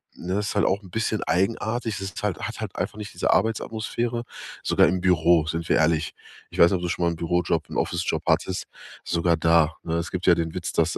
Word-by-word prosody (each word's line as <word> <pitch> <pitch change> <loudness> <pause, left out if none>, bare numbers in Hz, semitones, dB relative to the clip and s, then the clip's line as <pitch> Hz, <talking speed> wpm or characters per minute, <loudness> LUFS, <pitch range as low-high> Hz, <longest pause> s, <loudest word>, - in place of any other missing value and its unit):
ne, 90 +2 -4
das 105 +1 -1
ist - - -4
halt 100 - +3
auch 100 +2 +1
'n 95 - -13
bisschen 110 +1 -1
eigenartig. 110 +6 0
Das 95 - -4
ist 95 - -7
halt 100 -6 0
hat - - -5
halt - - -5
einfach - - -3
nicht 105 -1 -7
diese - - 0
Arbeitsatmosphäre, 115 +1 -1 0.4
sogar - - +4
im 95 - 0
Büro, 85 -2 +4
sind 80 0 -3
wir - - +4
ehrlich. 80 -1 +1 0.4
Ich - - -9
weiß 85 - +8
nicht, 95 - +2
ob - - -7
du 90 - -1
schon 85 - -1
mal 85 - +2
'n - - -4
Bürojob 85 -1 0
'n - - -5
Office-Job 85 -1 -1
hattest 95 -1 +1 0.4
sogar 85 0 +1
da, 80 -1 +3
ne? 80 - -3
Es 85 0 -2
gibt 90 -1 -3
ja 90 - +7
den 80 -1 -2
Witz, 90 - -4
dass 80 0 +1
90 Hz, 240 wpm, -24 LUFS, 85-100 Hz, 0.4 s, weiß